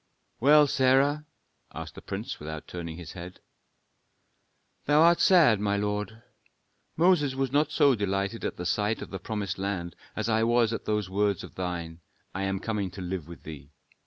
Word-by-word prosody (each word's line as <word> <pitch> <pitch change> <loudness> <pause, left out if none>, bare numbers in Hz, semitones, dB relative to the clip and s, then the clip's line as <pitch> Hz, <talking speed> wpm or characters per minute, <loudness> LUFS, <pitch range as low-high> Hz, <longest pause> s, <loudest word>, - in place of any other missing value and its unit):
"Well, 150 +4 +6
Sarah?" 140 +3 +2 0.5
asked - - -7
the - - -11
prince, - - -5
without 80 +1 -7
turning 85 -2 -7
his 85 -4 -9
head. 90 0 -9 1.5
"Thou 145 +1 +4
art 170 +2 +6
sad, 165 - +5
my 100 0 0
lord. 105 +2 -3 0.7
Moses 160 -5 +3
was 135 -1 -1
not 150 +2 +2
so 140 -2 +4
delighted 100 0 -2
at 90 - -3
sight 105 +3 0
of - - -11
the 95 - -5
promised 100 -2 -4
land 95 -3 -3 0.2
as 110 0 -2
I 110 -1 +2
was 115 0 +3
at - - -5
those 105 -2 0
words 100 0 0
of - - -10
thine: 85 -3 -5 0.3
'I 95 - -3
am 95 0 -1
coming 105 -2 -2
to 95 +2 -9
live 90 -3 -4
with 85 - -11
thee.' 75 -3 -9
105 Hz, 170 wpm, -27 LUFS, 90-130 Hz, 1.5 s, Well